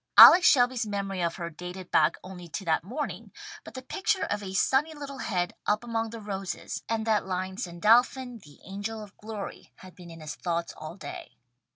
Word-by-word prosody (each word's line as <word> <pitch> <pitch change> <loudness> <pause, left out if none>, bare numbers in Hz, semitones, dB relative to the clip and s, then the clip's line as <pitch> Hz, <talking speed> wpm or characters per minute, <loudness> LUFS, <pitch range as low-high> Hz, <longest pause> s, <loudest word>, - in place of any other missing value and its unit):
Alex 355 0 +11
Shelby's 245 -3 +4
memory 195 -2 -3
of 170 -1 0
her 170 -2 -5
dated 180 +3 -8
back 155 +1 +4
only 180 -2 -9
to 205 +2 -6
that 160 -1 +1
morning, 255 - -5 0.3
but - - -12
the 260 - -7
picture 385 +8 0
of 205 - -2
a 190 -1 -6
sunny 285 - +2
little 280 -2 -7
head 180 -7 -1
up 210 +2 +2
among 230 -1 -2
the 230 +1 -8
roses, 195 -3 -5
and 225 -1 -1
that 215 -3 +1
line 185 0 -3
"Sandalphon 235 +6 +2
the 145 -7 -17
angel 205 +3 -5
of 205 -1 -14
glory" 215 -2 -7
had 185 -1 -14
been 175 -2 -13
in 165 0 -11
his 155 -2 -6
thoughts 170 +2 -3
all 155 +2 -8
day. 195 - -9
200 Hz, 195 wpm, -28 LUFS, 180-230 Hz, 0.3 s, Alex